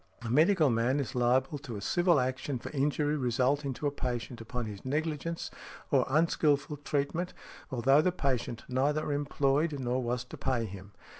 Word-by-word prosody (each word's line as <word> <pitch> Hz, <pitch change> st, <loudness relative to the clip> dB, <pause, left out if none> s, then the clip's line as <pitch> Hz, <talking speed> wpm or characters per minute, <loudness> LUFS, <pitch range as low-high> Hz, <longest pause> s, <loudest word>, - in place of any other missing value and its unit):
A 115 Hz, -, -3 dB
medical 155 Hz, +1 st, +4 dB
man 120 Hz, +5 st, +2 dB
is 135 Hz, -6 st, -3 dB
liable 130 Hz, +4 st, +2 dB
to 130 Hz, -5 st, -7 dB
a 100 Hz, -, -5 dB
civil 175 Hz, -, +3 dB
action 130 Hz, +2 st, -1 dB
for -, -, -8 dB
injury 150 Hz, +1 st, +1 dB
resulting 135 Hz, +2 st, +1 dB
to 145 Hz, -, -6 dB
a 145 Hz, -, +2 dB
patient 125 Hz, -3 st, -4 dB
from 125 Hz, -2 st, -2 dB
his 105 Hz, -2 st, -7 dB
negligence 155 Hz, +4 st, -2 dB, 0.4 s
or 135 Hz, -4 st, +3 dB
unskilful 150 Hz, -1 st, +2 dB
treatment, 145 Hz, +5 st, -2 dB, 0.3 s
although 135 Hz, +2 st, +4 dB
the 180 Hz, -, +2 dB
patient 130 Hz, -8 st, -2 dB
neither 145 Hz, +4 st, 0 dB
employed 145 Hz, +1 st, +1 dB
nor 125 Hz, 0 st, 0 dB
was 120 Hz, 0 st, -1 dB
to -, -, -10 dB
pay 120 Hz, -3 st, 0 dB
him. 100 Hz, 0 st, -10 dB
135 Hz, 165 wpm, -30 LUFS, 125-150 Hz, 0.4 s, medical